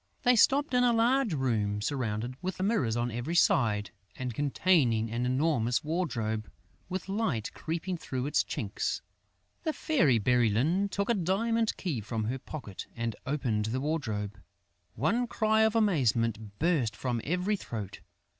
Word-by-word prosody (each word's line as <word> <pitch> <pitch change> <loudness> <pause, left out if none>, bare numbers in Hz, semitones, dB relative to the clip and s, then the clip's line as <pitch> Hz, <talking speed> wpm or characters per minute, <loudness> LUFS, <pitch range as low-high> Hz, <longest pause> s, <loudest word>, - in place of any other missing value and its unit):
They 250 0 +5
stopped 275 +5 +4
in 250 0 +4
a 245 -1 +4
large 235 - +2
room 110 -6 0
surrounded 120 -1 -2
with 185 0 -4
mirrors 185 - +1
on 120 +1 -1
every 120 +9 -3
side 105 - +3 0.2
and 125 -2 -4
containing 135 -5 +2
an 120 +2 -1
enormous 130 -3 +1
wardrobe 120 -10 -2 0.4
with 185 0 -4
light 195 - -1
creeping 170 +3 -3
through 130 -5 -4
its 145 - +2
chinks. - - -3 0.6
The 315 -2 -1
Fairy 155 - +2
Bérylune 125 - +2
took 200 +3 0
a - - +4
diamond 220 +4 +1
key 155 - -2
from 110 +1 -3
her 125 +5 -2
pocket 125 -9 -8
and 115 -2 -2
opened 125 -7 0
the 115 +4 -1
wardrobe. 110 -10 -2 0.6
One 225 - +1
cry 220 -1 +2
of 220 0 +3
amazement 115 - +1
burst 145 -10 +1
from 120 -3 -2
every 180 +6 0
throat. 105 - -6
135 Hz, 145 wpm, -30 LUFS, 115-190 Hz, 0.6 s, They